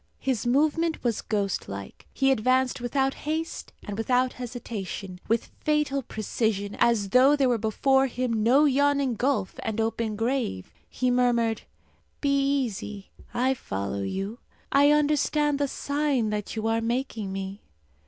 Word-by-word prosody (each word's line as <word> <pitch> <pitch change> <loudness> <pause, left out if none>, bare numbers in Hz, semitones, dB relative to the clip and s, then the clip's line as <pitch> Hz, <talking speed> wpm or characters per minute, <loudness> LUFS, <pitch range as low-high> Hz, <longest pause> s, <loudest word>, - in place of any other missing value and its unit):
His 250 -4 -1
movement 310 +5 +1
was 235 -4 0
ghost 200 -3 -2
like. 100 0 -8
He 270 0 +2
advanced 255 +1 +2
without 270 +2 +1
haste 320 +2 -4
and 205 +1 -5
without 250 +2 +2
hesitation, 215 -6 -6
with 230 +1 0
fatal 300 -2 +1
precision, 215 -3 -2
as 215 -4 +3
though 260 +6 +6
there 275 -2 +2
were 240 -2 +2
before 265 +5 +2
him 240 -3 -1
no 260 +7 +5
yawning 280 -1 +2
gulf 235 -5 0
and 225 0 -3
open 225 -1 -1
grave. 225 - -2 0.2
He 255 -1 0
murmured, 235 -3 +2 0.6
"Be 280 -1 +2
easy. 250 -8 -1 0.2
I 260 +2 +2
follow 100 - -4
you. 195 - -4 0.3
I 285 +1 +5
understand 295 0 +2
the 285 - +1
sign 280 -5 0
that 210 0 -3
you 220 0 -3
are 225 0 +1
making 230 -4 -2
me." 195 +1 -5
245 Hz, 145 wpm, -26 LUFS, 215-275 Hz, 0.6 s, though